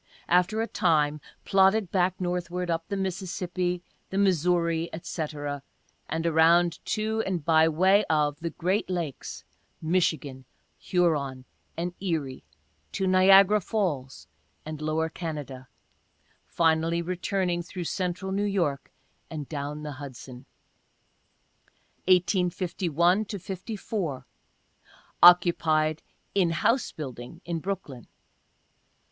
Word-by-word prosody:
After 180 +6 +2
a - - -3
time, 150 -6 +1 0.2
plodded 195 0 +3
back 185 -1 +1
northward, 180 -1 -2
up 165 0 -2
the 200 - -3
Mississippi, 180 -1 -2 0.3
the 190 - -3
Missouri, 170 -3 +2
&c, 165 -1 -4 0.9
and 165 +1 -2
around 170 +1 +4
to, 220 +1 -1
and 180 -6 -3
by 160 0 +5
way 190 +6 +4
of, 150 -2 +1
the 170 - -3
great 185 +6 -1
lakes, 170 -7 -4 0.4
Michigan, 155 -6 -1 0.3
Huron 145 -8 0 0.3
and 175 +1 -2
Erie, 155 -9 -3 0.5
to 190 - -1
Niagara 195 +2 +6
Falls 165 - -2 0.4
and 155 -1 -6
lower 155 +1 0
Canada 150 -6 -6 0.4
— - - -40
finally 165 +1 +1
returning 180 0 -1
through 180 +1 -6
Central 185 +2 -3
New 195 +1 0
York, 170 -9 -1 0.4
and 150 -4 -6
down 150 0 -5
the 150 - -5
Hudson. 130 -1 -10 1.6
1851 180 0 +2
54. 190 - -5 0.5
— - - -29
Occupied 160 -3 +5 0.3
in 190 -4 +3
house 230 - +1
building 130 +2 -8
in 170 -1 -2
Brooklyn. 160 - -5
175 Hz, 105 wpm, -27 LUFS, 155-185 Hz, 1.6 s, Niagara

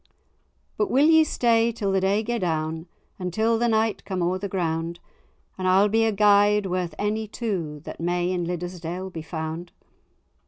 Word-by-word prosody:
"But 420 - 0
will 275 +3 +4
ye 320 0 +6
stay 235 -5 +2
till 205 -3 -2
the 190 0 +1
day 200 +3 +1
gae 240 +1 -2
down, 160 -1 -2 0.3
Until 220 +6 0
the 240 - +2
night 220 -1 +1
come 185 -3 -2
o'er 180 +2 0
the 200 +1 -4
ground, 170 -2 -2 0.6
And 185 - -1
I'll 195 +3 +4
be 225 +2 +3
a 220 - +2
guide 205 0 +4
worth 180 -3 -2
any 215 +1 -1
two 180 -10 -4
That - - -8
may 175 +1 0
in 180 -1 -1
Liddesdale 180 +1 -5
be 165 - -6
found? 160 +1 -5
190 Hz, 170 wpm, -24 LUFS, 175-220 Hz, 0.6 s, ye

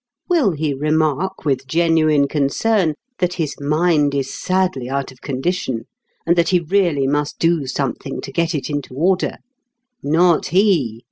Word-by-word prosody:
Will 310 - +2
he 150 -1 -1
remark 155 +5 -1
with 135 -2 0
genuine 155 -2 +3
concern 155 +5 +1 0.2
that 180 -1 0
his 155 -4 -3
mind 150 0 +2
is 135 -1 -2
sadly 180 -9 -1
out 135 0 -2
of 130 - -19
condition 135 -3 -2 0.4
and 170 - +3
that 170 -1 +2
he 180 - +3
really 170 -5 +1
must 145 +2 -1
do 165 -4 +1
something 135 0 -3
to - - -8
get 165 +3 0
it 145 - -3
into 145 -3 -4
order? 180 +6 +1 0.7
Not 165 +3 +3
he. 170 - +2
155 Hz, 150 wpm, -19 LUFS, 140-175 Hz, 0.7 s, genuine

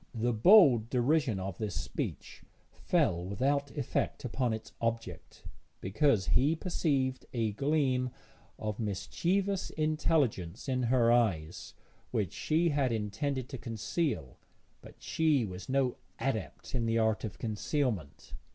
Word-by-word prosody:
The 120 +2 0
bold 125 - +6
derision 130 -3 +1
of 95 -1 -5
this 105 -5 -3
speech - - -5 0.3
fell 85 0 +1
without 140 +9 0
effect 135 -1 -2
upon 125 0 0
its 110 0 -5
object, 115 0 -4 0.4
because 110 +1 +1
he 145 +6 +3
perceived 140 -7 -1
a 115 -3 0
gleam 135 0 +1 0.5
of 105 0 -4
mischievous 180 - -1
intelligence 150 - 0
in 130 -1 0
her 120 -2 +4
eyes 95 -10 0 0.3
which 100 -6 -1
she 165 +2 +1
had 140 -4 +1
intended 115 +5 -2
to 130 - -6
conceal, 115 - -3 0.4
but - - -13
she 155 -7 +2
was 95 +4 -8
no 130 -2 +1 0.2
adept 115 -5 -4
in 120 -3 0
the 115 0 +1
art 110 -1 +1
of 110 -4 -5
concealment. 110 - -2
120 Hz, 125 wpm, -31 LUFS, 110-145 Hz, 0.5 s, bold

